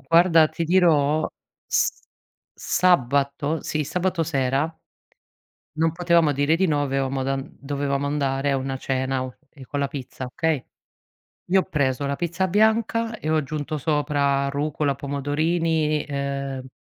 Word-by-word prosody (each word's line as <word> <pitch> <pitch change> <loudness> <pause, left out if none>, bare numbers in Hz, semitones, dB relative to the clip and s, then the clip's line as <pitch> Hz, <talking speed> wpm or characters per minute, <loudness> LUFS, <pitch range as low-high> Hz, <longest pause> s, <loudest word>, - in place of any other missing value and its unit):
Guarda, 165 -1 +5
ti 170 - -4
dirò, 155 -4 +3 0.4
s - - +2 0.6
sabato 145 -2 +1
sì, 155 -1 -1
sabato 180 +2 -1
sera 140 0 0 1.0
non 160 0 +2
potevamo 170 -3 +3
dire 145 +3 +2
di 190 +2 +2
no, 145 -3 +1
avevamo 135 -1 -1
dan 135 0 -3
dovevamo 140 0 -2
andare 140 -1 0
a 135 - +2
una 135 0 -3
cena 130 0 -1
o 130 -1 -7
ehm, 140 - -15
con 145 - -4
la 140 - +1
pizza, 130 -1 -7
okay? 155 +2 -1 0.9
Io 190 +1 +5
ho - - 0
preso 140 -5 0
la 140 - -1
pizza 175 +4 -1
bianca 220 +3 +1
e 155 - -3
ho 160 - +3
aggiunto 155 +1 -2
sopra 145 -2 +1
rucola, 145 0 -1
pomodorini 150 +3 0
e, 140 -1 -3
uhm - - -12
145 Hz, 145 wpm, -24 LUFS, 140-165 Hz, 1.0 s, Guarda